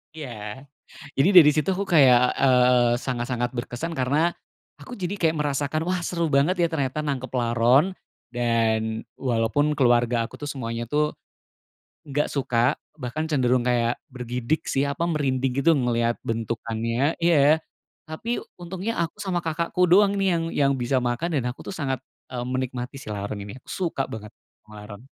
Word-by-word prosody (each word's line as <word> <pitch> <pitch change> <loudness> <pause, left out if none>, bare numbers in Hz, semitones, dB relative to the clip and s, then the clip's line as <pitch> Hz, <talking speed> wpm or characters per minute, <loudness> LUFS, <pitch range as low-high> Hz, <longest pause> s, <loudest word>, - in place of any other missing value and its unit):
Iya. 125 -3 -8 0.5
Jadi, 140 - +5
dari 160 -5 +9
situ, 155 +4 -1
aku 195 - -2
kayak, 130 -10 +4
eee, 125 -2 +4
sangat-sangat, 120 -1 -2
berkesan 120 +7 -4
karena, 150 +4 +1 0.5
aku 250 - -9
jadi 190 -3 -3
kayak 165 -2 +1
merasakan, 145 +1 -1
"Wah 180 0 0
seru 170 -2 -1
banget 145 +6 +3
ya - - +5
ternyata 150 -2 -2
nangkep 135 -3 -3
laron." 120 +6 +3 0.4
Dan 115 -2 0 0.2
walaupun 130 +4 +1
keluarga 120 -3 +3
aku - - -13
tuh 145 - -5
semuanya 115 -3 -4
tuh 150 +5 +1 1.0
nggak 145 +1 0
suka, 125 -3 +1 0.2
bahkan 145 +4 -3
cenderung 130 -4 +2
kayak 120 -1 +1
bergidik 125 +3 -3
sih, 135 - +1
apa, 140 +4 -1
merinding 135 -5 0
gitu 165 - +5
ngelihat 120 -2 0
bentukannya. 115 +4 -1
Iya. 160 -2 +4 0.4
Tapi 220 +10 -4 0.2
untungnya, 190 +6 -4
aku 170 -1 -2
sama 190 -3 -1
kakakku 170 +2 0
doang 200 +3 +5
nih 195 -1 +2
yang 165 - -1
yang 140 -1 +2
bisa 130 +1 0
makan. 125 +8 -1
Dan 125 - -2
aku 125 - -10
tuh - - -6
sangat, 135 -6 -3 0.3
eee, 120 -1 -3
menikmati 130 +1 -4
si - - -12
laron 100 +1 -4
ini, 100 0 -8
suka 165 -7 -3
banget 105 -1 -8 0.3
sama 105 -1 -11
laron. 105 +3 -11
130 Hz, 155 wpm, -24 LUFS, 120-155 Hz, 1.0 s, dari